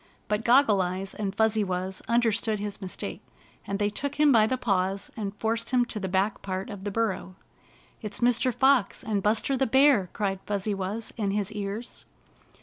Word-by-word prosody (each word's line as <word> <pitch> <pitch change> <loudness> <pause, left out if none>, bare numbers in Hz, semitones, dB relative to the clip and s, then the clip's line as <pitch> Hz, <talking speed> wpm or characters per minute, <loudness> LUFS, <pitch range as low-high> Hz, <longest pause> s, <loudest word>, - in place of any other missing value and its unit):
But 210 +1 -1
(ioggle 235 -5 +5
Eyes 185 +2 -3
and 200 -2 -3
Fuzzy 220 0 +2
Wuzz 185 0 -3
under 235 0 +3
stood 215 0 -1
his 205 0 -5
mistake, 185 -1 -6 0.5
and 200 - -1
they 205 0 0
took 285 +6 -3
him 300 -1 +5
by 220 -4 +5
the 260 - 0
paws 195 -4 -1
and 205 -2 -4
forced 230 +2 -1
him 250 -2 +3
to 225 - -4
the 190 - -3
back 195 +3 0
part 190 0 -4
of 200 -1 -8
the - - -1
burrow. 195 -3 -2 0.7
"It's 210 -1 -4
Mr. 245 +1 +2
Fox 265 -3 +2
and 210 -2 -1
Buster 220 +6 +1
the 265 +1 +1
Bear!" 265 -6 +4
cried 195 -2 -1
Fuzzy 205 0 -1
Wuzz 200 +4 -4
in 205 -3 0
his 205 0 -1
ears. 210 +3 -6
210 Hz, 190 wpm, -27 LUFS, 195-230 Hz, 0.7 s, ioggle